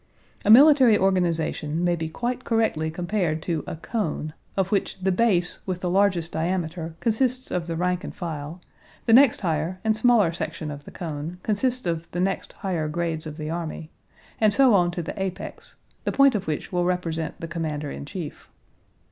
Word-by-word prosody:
A - - 0
military 260 -2 +8
organization 170 -4 0
may 175 0 +2
be 160 -1 -4
quite 245 +8 -3
correctly 220 -9 +1
compared 175 -1 -1
to 165 -4 -2
a - - -4
cone, 160 -4 -3 0.2
of 195 -1 +1
which 200 - 0
the 190 +1 +1
base 180 -4 +1
with 185 -1 -3
the 180 - -1
largest 185 -3 +2
diameter 165 -1 -2
consists 255 +2 0
of 175 -2 -2
the 165 - -2
rank 180 +2 0
and - - -7
file; 160 -1 -5 0.5
the 225 - +4
next 260 0 +6
higher 165 +1 -1
and 220 -1 +2
smaller 215 -6 +4
section 160 -2 -4
of 145 0 -9
the - - -10
cone 160 0 -5
consists 245 +3 0
of 165 -1 -2
the 175 - -2
next 195 +2 -1
higher 170 -5 0
grades 160 0 -2
of 150 0 -8
the 155 -1 -4
army, 165 -1 -5 0.5
and 215 -2 +4
so 265 -4 +6
on 175 -3 +4
to 175 0 -4
the 180 - -5
apex, 190 -1 -6 0.3
the - - 0
point 275 -1 +5
of 200 -3 -2
which 155 -2 -3
will 180 -1 +1
represent 165 -3 -2
the 165 - -5
commander 155 -3 -3
in - - -6
chief. 155 0 -7
175 Hz, 185 wpm, -25 LUFS, 160-205 Hz, 0.5 s, military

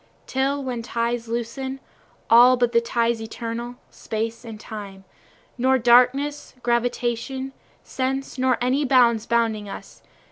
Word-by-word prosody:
Till 275 +2 -1
when 250 -3 -3
the 230 - -11
ties 235 0 -2
loosen, 240 +4 -4 0.5
All 245 +2 +7
but 245 -1 +1
the 235 -1 +3
ties 235 -1 0
eternal, 230 +2 -5 0.2
Time 220 +1 -3
and 225 -2 -9
Space, 200 -3 -8 0.6
Nor 260 +2 +3
darkness, 250 +5 +3
gravitation, 245 +2 -1 0.3
sense, 270 0 -3
nor 255 -1 +2
any 260 +4 +1
bounds 240 -4 +3
bounding 225 -3 0
us. - - -10
240 Hz, 130 wpm, -23 LUFS, 230-260 Hz, 0.6 s, All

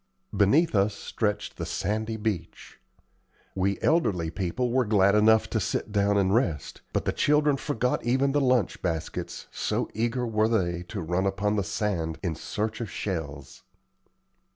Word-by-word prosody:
Beneath 140 - +4
us 100 0 +2
stretched 105 0 -3
the - - -3
sandy 110 +2 -2
beach. 105 -6 -4 0.7
We 95 +1 0
elderly 95 - +2
people 100 +8 -2
were 130 +1 +3
glad 100 -3 +3
enough 110 +1 +5
to - - +1
sit - - -2
down 100 0 +2
and 95 -1 +2
rest, 85 - -1
but - - -1
the - - +2
children 150 -1 +3
forgot 125 -3 -1
even 130 +3 +2
the 145 +1 +2
lunch 125 -7 +1
baskets, 80 -3 -4
so - - -2
eager 120 +3 -1
were 110 -1 +2
they 85 -6 0
to 100 -1 -5
run 90 +4 0
upon 100 +2 0
the 100 - +1
sand 95 -5 -2
in 85 - -1
search 105 +8 -4
of 115 - -4
shells. 75 -8 -5
105 Hz, 155 wpm, -27 LUFS, 95-115 Hz, 0.7 s, enough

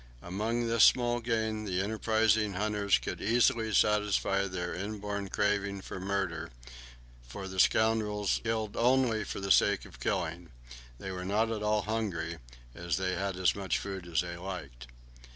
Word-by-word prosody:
Among 110 +6 -1
this 115 -1 +4
small 120 -1 +4
game 110 -2 -1
the 95 -2 -1
enterprising 110 0 +1
hunters 105 +1 +1
could - - -5
easily 115 -1 +2
satisfy 105 -1 +2
their 90 -2 -4
inborn 100 0 -4
craving 100 -1 0
for 95 - -7
murder, 95 -4 -2 0.8
for 95 +10 -7
the 95 0 -5
scoundrels 105 -1 +2
only 115 +2 +2
killed 105 - -5
for - - -4
the 95 0 -2
sake 100 0 +4
of - - -14
killing; 85 0 -2 0.5
they 95 - -6
were 90 -1 -5
not 105 +4 +1
at 110 -2 -3
all 105 0 +1
hungry, 90 -7 -3 0.3
as 85 +4 -2
they 95 0 -1
had 95 -1 -2
as 95 -1 +3
much 100 -2 -1
food 95 -3 -6
as 85 -1 +1
they 85 -1 -5
liked. 80 -10 -7
100 Hz, 155 wpm, -30 LUFS, 95-110 Hz, 0.8 s, this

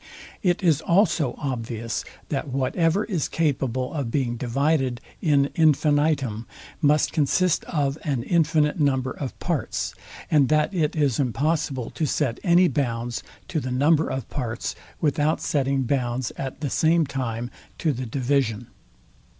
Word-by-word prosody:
It 180 0 +1
is 160 -4 +3
also 170 - +2
obvious, 115 -4 -3 0.3
that - - -2
whatever 160 +8 +1
is 180 -9 -1
capable 130 -5 -1
of 140 -6 -2
being 120 -2 0
divided 130 +1 0 0.2
in 140 -3 +3
infinitum, 145 -6 +2 0.3
must 150 -1 +3
consist 170 +3 +2
of 145 -2 -1
an 135 -7 -1
infinite 160 -1 +2
number 130 -3 +1
of 135 -3 -6
parts, - - -2 0.4
and 145 -5 +4
that 155 +5 +2
it 155 -5 0
is 145 -6 +1
impossible 140 0 0
to 155 - -1
set 130 -4 0
any 180 0 +5
bounds 120 -5 -2 0.3
to 165 - 0
the 130 - -4
number 145 +5 +3
of 130 -4 -4
parts, 120 -4 -3 0.3
without 150 0 +1
setting 135 -2 0
bounds 125 -1 -1
at 135 +2 -6
the 145 -4 -2
same 165 0 +3
time 120 -4 -3 0.3
to 155 -3 +1
the 130 0 -4
division. 125 -2 0
140 Hz, 140 wpm, -24 LUFS, 125-155 Hz, 0.4 s, any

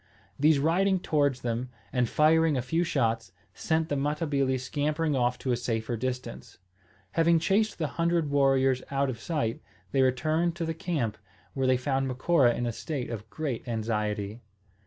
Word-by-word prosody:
These 150 +1 +5
riding 185 +6 +2
towards 145 -6 +1
them, 120 +1 -2 0.2
and 125 -2 +1
firing 160 -1 +4
a 125 - -1
few 165 +7 0
shots, 115 - 0 0.2
sent 160 0 0
the 145 - -1
Matabili 140 -2 0
scampering 150 +4 -1
off 125 -1 +1
to 130 - -2
a - - +3
safer 120 -1 -2
distance. 125 +2 -5 0.5
Having 165 +4 +4
chased 205 +6 +1
the 160 - -1 0.2
hundred 170 -3 +1
warriors 135 -2 +3
out 140 -1 0
of 115 - -8
sight, 130 -5 -2 0.3
they 135 - +2
returned 155 +7 +1
to 170 -2 -3
the 165 - -2
camp, 155 - -2 0.3
where 135 -1 0
they 130 0 +4
found 135 +1 -1
Macora 130 -1 +3
in 120 - -2
a 120 - -1
state 130 +1 -4
of 110 -1 -6
great 140 -5 -4
anxiety. 105 -1 -2
135 Hz, 165 wpm, -28 LUFS, 120-160 Hz, 0.5 s, These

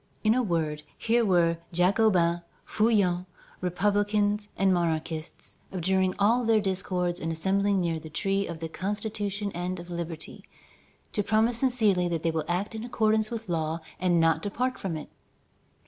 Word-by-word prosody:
In 215 0 +5
a 255 - +2
word, 160 -7 -1 0.2
here 235 +1 +2
were 170 -4 +3
Jacobins, 180 -1 +3 0.3
Feuillants, 195 -5 +2 0.3
republicans, 205 +3 +1
and 195 -1 +3
monarchists, 160 -1 -3
abjuring 185 +1 +1
all 230 +5 +3
their 225 -1 +4
discords 180 -3 -1
and 165 - -2
assembling 195 +4 +1
near 170 -2 0
the 155 - -10
tree 195 +5 0
of 165 -1 -7
the 165 - -2
Constitution 205 +2 -3
and 180 +1 -3
of 175 +1 -9
liberty, 170 -2 -6 0.7
to 210 - +1
promise 220 +3 +2
sincerely 220 -9 +2
that 165 -2 -2
they 165 - +2
will 160 -2 -2
act 180 +6 -1
in 220 0 -5
accordance 220 -2 +1
with 225 -2 -5
law 160 -1 -1 0.2
and 175 -2 +3
not 165 -1 +3
depart 250 +7 -2
from 175 -5 -3
it. 150 - -8
190 Hz, 155 wpm, -27 LUFS, 170-210 Hz, 0.7 s, In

